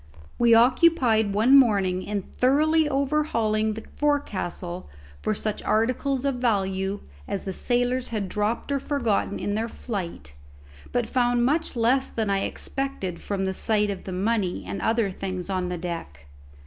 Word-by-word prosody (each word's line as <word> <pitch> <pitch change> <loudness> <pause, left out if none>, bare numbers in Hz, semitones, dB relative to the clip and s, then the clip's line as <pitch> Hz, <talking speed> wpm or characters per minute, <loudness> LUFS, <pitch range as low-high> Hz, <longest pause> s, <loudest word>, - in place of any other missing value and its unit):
We 235 -1 +6
occupied 245 -4 +4
one 235 +6 +5
morning 200 -8 +4
in 200 0 -3
thoroughly 305 - +2
overhauling 245 -7 0
the 220 - -7
forecastle 190 - -2 0.3
for 215 - 0
such 215 0 -3
articles 255 +4 0
of 275 -3 0
value 195 -4 0 0.3
as 195 - -3
the 190 - -4
sailors 245 +3 0
had 210 -4 -3
dropped 210 +7 -2
or 280 - +1
forgotten 240 -8 0
in 205 - -2
their 225 +2 -1
flight; 190 - -6 0.6
but 240 -2 0
found 245 0 +2
much 305 +2 0
less 245 +3 +2
than 220 -3 -1
I 195 - +2
had - - -1
expected 270 -11 -4
from 195 -1 -2
the 190 - -1
sight 210 +1 +1
of 195 - -7
the 190 - -5
money 185 - -1
and 100 +1 -5
other 225 -3 +1
things 185 0 -5
on 185 -1 -1
the 180 - -3
deck. 165 - -6
220 Hz, 160 wpm, -25 LUFS, 195-255 Hz, 0.6 s, We